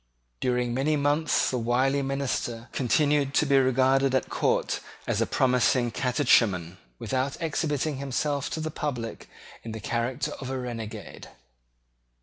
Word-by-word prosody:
During 125 -1 0
many 140 +5 +1
months 145 +2 +2
the 125 - -1
wily 130 +4 +1
minister 135 -4 -2
continued 140 +2 +1
to - - +4
be 140 -1 +4
regarded 130 +1 +3
at 130 - 0
court - - +1 0.3
as - - 0
a - - +1
promising 125 -1 +2
catechumen, 110 - +2 0.2
without 130 - -2
exhibiting 155 -3 -1
himself 140 +1 -1
to - - -4
the 155 0 -3
public 125 -7 -4 0.3
in 115 - -7
the 110 - -5
character 120 +5 -2
of 130 - -5
a 135 - -2
renegade. 120 -4 -7
130 Hz, 135 wpm, -27 LUFS, 120-140 Hz, 0.3 s, to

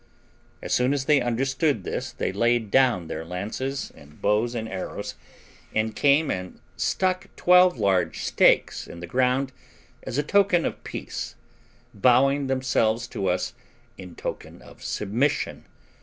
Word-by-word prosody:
As - - -2
soon 125 +2 +3
as 135 -2 -2
they 150 -2 +4
understood 130 - 0
this - - -4
they - - -2
laid 115 +1 +1
down 125 -9 +3
their 80 0 -5
lances, 105 +11 -4
and 75 +1 -17
bows 110 +4 +1
and 110 -1 -3
arrows, 95 -3 -5 0.6
and 110 0 0
came 145 +2 +3
and 90 0 -5 0.2
stuck 185 -1 0
twelve 180 -2 +5
large 100 -4 +1
stakes - - +3
in 85 - -10
the 85 - -6
ground 130 +6 +1 0.5
as 120 - -5
a 145 - +2
token 190 0 +3
of - - -4
peace, - - -6 0.6
bowing 135 +5 +3
themselves 125 -4 +1
to 95 - -3
us 90 +3 -1 0.4
in 90 -4 -11
token - - -6
of - - -16
submission. 115 +8 -1
120 Hz, 140 wpm, -25 LUFS, 100-140 Hz, 0.6 s, twelve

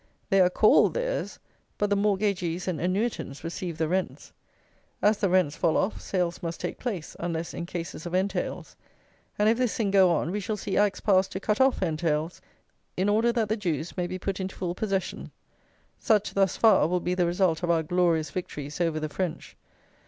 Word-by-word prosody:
They 195 0 +5
are 180 - +5
called 215 +4 +4
theirs; - - -2 0.4
but 205 0 0
the - - +4
mortgagees 195 -4 0
and 180 -4 -2
annuitants 185 - -2
receive 170 0 -5
the 160 -1 0
rents. 185 +3 -3 0.7
As 210 +1 +3
the 195 - +1
rents 180 -5 +2
fall 165 -3 +1
off, 200 - -1
sales 180 -3 -2
must 165 -1 -4
take - - -4
place, 200 -11 -4
unless 170 -1 -3
in 170 - -5
cases 170 -1 -6
of 175 - -3
entails; 190 0 -2 0.6
and 210 - +3
if 230 +2 +3
this 250 -3 +1
thing 210 -4 0
go 190 -2 +6
on, 170 0 0
we 205 - -2
shall 210 +2 -3
see 195 - -3
Acts 205 -1 +2
passed 190 -2 +3
to 190 - -3
cut 210 +4 0
off 265 -6 +3
entails, 160 -1 -1 0.6
in 190 +3 +1
order 225 +3 +3
that 230 -2 0
the 215 - 0
Jews 170 -6 -3
may 180 -1 -1
be 185 +1 -4
put 195 +1 -3
into 190 0 -4
full 175 -2 -3
possession. 195 0 -3 0.7
Such, 210 -2 +2
thus 195 -1 +2
far, 210 -9 +5
will 180 +2 0
be 180 +1 -1
the 180 -1 +1
result 175 -2 +1
of 175 - -2
our 165 -1 +3
"glorious 170 -1 +1
victories" 150 -3 -5
over 165 -2 +1
the 155 - -2
French! 175 +2 -4
185 Hz, 195 wpm, -27 LUFS, 170-205 Hz, 0.7 s, go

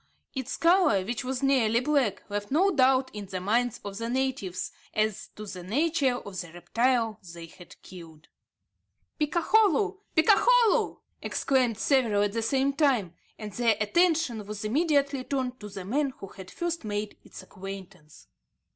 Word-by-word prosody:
Its 265 -2 -4
colour, 335 - +4
which 235 +3 -3
was 260 +1 -3
nearly 240 -5 +3
black, 260 -5 0
left 205 0 -4
no 370 +8 +3
doubt 260 0 +3
in 205 -2 -7
the 185 -1 -4
minds 230 +5 0
of 200 +1 -6
the 230 0 -3
natives 245 -8 -2 0.2
as 215 -1 0
to 215 - -8
the 185 -3 -7
nature 275 - +1
of 200 -5 -6
the 175 -3 -10
reptile 230 +4 0 0.2
they 170 -1 -8
had 170 +1 -15
killed. 165 -4 -13 0.9
"Picakholu! 385 +5 +2 0.2
picakholu!" 470 +7 +4 0.2
exclaimed 255 -5 0
several 225 -6 +2
at 205 -1 -1
the 230 - -1
same 270 +4 +1
time, 255 - +1 0.2
and 210 -2 -7
their 230 -3 +2
attention 310 - +1
was 210 0 -6
immediately 280 +1 +1
turned 255 -2 -3
to 210 - -8
the 195 -2 -8
man 275 +7 0
who - - -8
had 190 -1 -11
first 340 -3 -3
made 210 0 -4
its - - -11
acquaintance. 190 -5 -10
240 Hz, 155 wpm, -27 LUFS, 205-280 Hz, 0.9 s, colour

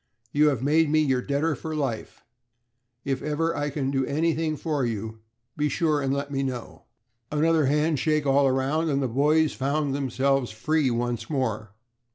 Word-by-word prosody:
You 150 +1 +4
have 135 -4 0
made 155 +2 +3
me 155 +1 +3
your 135 -4 +1
debtor 145 +4 0
for 155 +3 -5
life. 135 -7 -4 0.8
If 135 -1 -1
I 150 -1 -1
can 135 -1 -2
ever - - -2
do 135 -1 +1
anything 160 +1 0
for 150 -4 -1
you, 110 -1 -3 0.4
be 150 0 0
sure 150 0 +1
and 135 -1 -1
let 140 +1 -2
me 135 -1 -1
know." 130 -3 -5 0.5
Another 155 0 +2
handshake 150 +1 +1
all 140 0 +4
around, 135 +5 0
and 140 -2 +1
the 135 - 0
boys 150 +6 +2
found 140 +1 -1
themselves 135 -1 0
free 150 +6 0
once 120 -1 -2
more. 110 -8 -2
140 Hz, 170 wpm, -25 LUFS, 130-155 Hz, 0.8 s, You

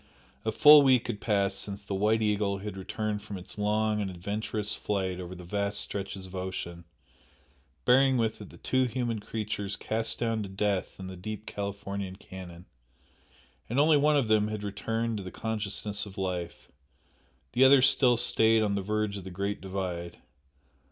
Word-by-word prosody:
A 110 - 0
full 150 +6 +9
week 130 -4 +4
had 105 -4 -4
passed 100 -3 +1
since 100 0 -4
the 100 - -5
"White 105 +3 +2
Eagle" 105 -2 +1
had 100 0 -6
returned 105 +2 -3
from 105 -1 -7
its 90 +3 -7
long 105 +1 +1
and 100 - -2
adventurous 105 +3 -3
flight 95 -3 -2
over 90 0 -7
the 90 - -10
vast 100 +3 -2
stretches 95 -1 -5
of 95 - -12
ocean, 85 -2 -5 1.0
bearing 130 +1 +5
with 110 -2 -1
it 105 - -9
the - - -14
two 130 0 +1
human 120 -2 -2
creatures 105 -2 -3
cast 110 +1 -1
down 115 -2 -1
to 100 - -5
death 100 -1 -1
in 95 - -6
the 95 0 -7
deep 105 +4 -6
Californian 100 -1 -5
canon, 90 -2 -10 1.0
and 120 +4 +1
only 155 +1 +6
one 150 +1 +4
of 135 -5 +1
them 110 -1 +3
had 105 -1 -4
returned 115 +2 -2
to 100 - -5
the 95 - -6
consciousness 105 -1 -3
of 100 0 -12
life, 90 -3 -4 0.8
the 125 - +4
other 130 0 +7
still 130 -3 +5
stayed 110 -1 +3
on 105 -1 +1
the 100 - 0
verge 105 +1 -1
of 100 - -7
the 95 - -7
"Great 100 +3 -3
Divide." 90 -3 -4
105 Hz, 180 wpm, -29 LUFS, 95-110 Hz, 1.0 s, full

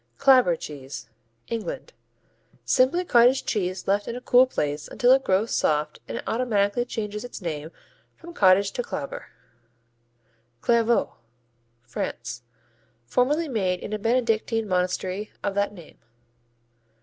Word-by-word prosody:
Clabber 255 -10 +5
cheese 140 -6 -8 0.4
England 230 - -5 0.7
Simply 270 +8 +3
cottage 245 -1 +4
cheese 185 -3 -2
left 200 +1 +1
in 235 - -4
a - - -4
cool 250 +1 +5
place 145 - -3
until 245 0 +2
it 265 +1 +5
grows 195 +4 +1
soft 150 0 0
and - - -5
automatically 225 -1 +1
changes 210 -2 -4
its 245 - -8
name 160 -4 -5 0.5
from 340 0 -12
cottage 195 - +4
to - - -2
clabber. - - -6 1.3
Clairvaux 235 - +2 0.7
France 120 0 -5 0.6
Formerly 285 - +1
made 190 -8 -1
in 210 - -6
a 215 - -2
Benedictine 225 -1 0
monastery 185 +2 -1
of 200 - -1
that 200 0 0
name. 175 -6 -14
210 Hz, 125 wpm, -25 LUFS, 185-250 Hz, 1.3 s, Clabber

